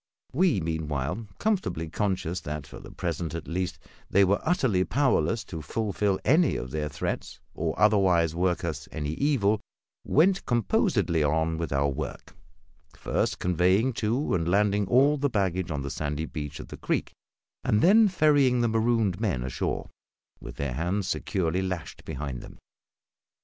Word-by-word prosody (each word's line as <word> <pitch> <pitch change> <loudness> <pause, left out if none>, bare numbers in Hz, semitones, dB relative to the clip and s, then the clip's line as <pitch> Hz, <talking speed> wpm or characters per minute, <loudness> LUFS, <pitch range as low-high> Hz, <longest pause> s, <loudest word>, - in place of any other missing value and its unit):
We, 165 - +3
meanwhile, 80 +4 -3
comfortably 190 - -1
conscious 95 -1 -1
that, 75 -1 -5
for - - -11
the - - -11
present 85 -2 -3
at 85 - -6
least, 90 +2 -2 0.3
they 100 - +5
were 100 +2 +2
utterly 130 - +2
powerless 120 -3 +1
to 80 -4 -7
fulfil 100 +2 -1
any 155 +1 +4
of 65 - -5
their 75 -1 -2
threats, 70 - -4
or 80 0 -3
otherwise 95 -6 +4
work 90 +1 0
us 75 -3 -4
any 75 -2 -3
evil, 110 - +1 0.4
went 185 +6 +3
composedly 105 -8 +1
on 80 +2 +1
with 85 - -3
our 70 +1 +2
work; 65 - -6 0.6
first - - -1
conveying 90 +8 +2
to 115 +6 -1
and 85 -2 0
landing 100 +1 +2
all 140 +6 +4
the 145 0 0
baggage 95 -5 0
on 70 -3 -3
the 70 - -4
sandy 75 +1 -3
beach 75 -3 -6
of - - -9
the - - -8
creek, - - -1 0.5
and 105 - +2
then 215 +4 +7
ferrying 145 -8 +3
the 120 - +2
marooned 110 -4 +1
men 95 - -1
ashore, 65 0 -3 0.5
with - - -9
their 70 -3 -3
hands 90 +7 -1
securely 95 -2 -1
lashed 90 -5 -5
behind 70 -5 -5
them. - - -12
95 Hz, 155 wpm, -27 LUFS, 80-115 Hz, 0.6 s, then